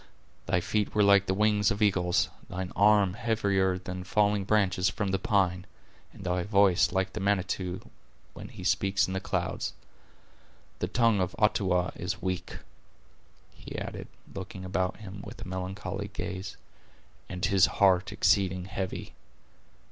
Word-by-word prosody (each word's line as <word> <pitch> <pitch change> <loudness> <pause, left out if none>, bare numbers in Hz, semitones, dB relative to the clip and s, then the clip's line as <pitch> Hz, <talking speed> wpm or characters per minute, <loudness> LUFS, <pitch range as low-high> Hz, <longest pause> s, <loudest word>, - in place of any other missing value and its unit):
Thy 90 - +2
feet 105 +3 -1
were 105 - +4
like 100 0 +5
the 95 - +2
wings 105 0 +3
of 100 -2 -2
eagles; 95 -5 +2 0.2
thine 90 0 -4
arm 100 -2 +4
heavier 100 -4 +1
than 90 0 -6
falling 105 +1 +1
branches 95 -3 +2
from 105 -3 -2
the 95 - 0
pine; 95 -2 +1 0.4
and - - -12
thy 90 0 0
voice 95 -3 +3
like 95 +1 -1
the - - -4
Manitou 95 -2 -1 0.5
when - - -9
He - - -10
speaks 95 0 +2
in 95 - -5
the 95 - -1
clouds. - - -2 1.1
The 90 - -1
tongue 115 0 +3
of 90 - -2
Uttawa 95 -4 +2
is - - -4
weak," 90 0 -3 1.0
he - - -9
added, - - -6 0.3
looking 95 0 -7
about 95 0 -1
him 100 -2 -9
with - - -10
a - - -8
melancholy 95 +2 -4
gaze, 95 -1 -5 0.7
"and 90 -2 -2
his 95 -2 +5
heart 95 -1 +3
exceeding 95 -2 +2
heavy. 95 -1 -5
95 Hz, 150 wpm, -28 LUFS, 90-100 Hz, 1.1 s, like